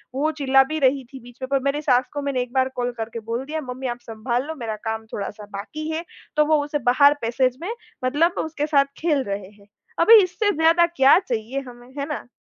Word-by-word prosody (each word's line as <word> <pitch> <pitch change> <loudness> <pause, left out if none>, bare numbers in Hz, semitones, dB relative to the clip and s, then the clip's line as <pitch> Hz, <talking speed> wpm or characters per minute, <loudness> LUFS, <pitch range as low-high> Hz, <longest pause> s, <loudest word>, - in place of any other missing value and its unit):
वो 305 +3 +1
चिल्ला 270 -1 +5
भी 315 - -1
रही 270 0 +2
थी 265 - -8
बीच 245 0 -15
में, 260 - -3
पर 275 - +3
मेरे 295 +2 -2
सास 255 -3 +2
को 290 - -3
मैंने 275 -3 -1
1 245 +1 -6
बार 260 0 +2
कॉल 245 0 -1
करके 225 +1 -5
बोल 240 +3 -2
दिया, 315 +2 -4
"मम्मी, 260 +1 -5
आप 240 0 -4
संभाल 235 +4 -2
लो, 320 - -5
मेरा 230 -6 -4
काम 220 0 -4
थोड़ा-सा 205 +1 -5
बाकी 310 +10 -6
है।" 325 +2 -3 0.3
तो 300 - +5
वो 305 -1 +3
उसे 295 0 -2
बाहर 285 +3 +6
पैसेज 250 +2 0
में 355 - -4 0.4
मतलब 310 +7 +2
उसके 305 -2 -2
साथ 280 -2 +4
खेल 300 -5 +1
रहे 200 -1 -5
हैं। 205 -1 -22 0.3
अभी 435 +5 +8
इससे 410 +3 0
ज़्यादा 330 +2 +5
क्या 285 -3 +5
चाहिए 250 - -3
हमें, 240 0 -13
है 280 - -1
ना। 295 -4 -5
270 Hz, 225 wpm, -23 LUFS, 245-310 Hz, 0.4 s, अभी